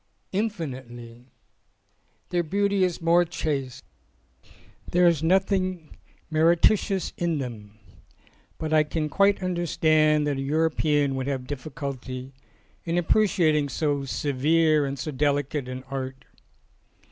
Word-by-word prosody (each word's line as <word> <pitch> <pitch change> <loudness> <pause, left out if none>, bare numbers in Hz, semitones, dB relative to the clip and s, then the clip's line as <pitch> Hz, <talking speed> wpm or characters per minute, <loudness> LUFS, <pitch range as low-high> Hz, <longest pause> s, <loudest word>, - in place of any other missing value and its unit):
"Infinitely. 130 - -5 1.0
Their 175 -1 +1
beauty 200 +3 +1
is 180 -2 -1
more 170 +1 +5
chaste. 145 -6 -3 1.1
There 180 +1 +3
is 170 -4 +3
nothing 185 -1 0 0.4
meretricious 175 +5 +2
in 170 -2 0
them. 110 -6 -7 0.8
But 155 0 -3
I 155 - +6
can 150 0 -2
quite 200 +3 +2
understand 155 -4 +2
that 145 -2 -1
a - - -3
European 150 -1 +1
would 130 0 -3
have 135 -2 -2
difficulty 135 -2 -6 0.5
in 170 0 -1
appreciating 165 -6 +2
so 145 -2 -1
severe 150 +3 +2
and 135 +1 -4
so 145 +4 -4
delicate 145 -1 -1
an 130 0 -6
art. 130 0 -6
155 Hz, 110 wpm, -25 LUFS, 135-175 Hz, 1.1 s, I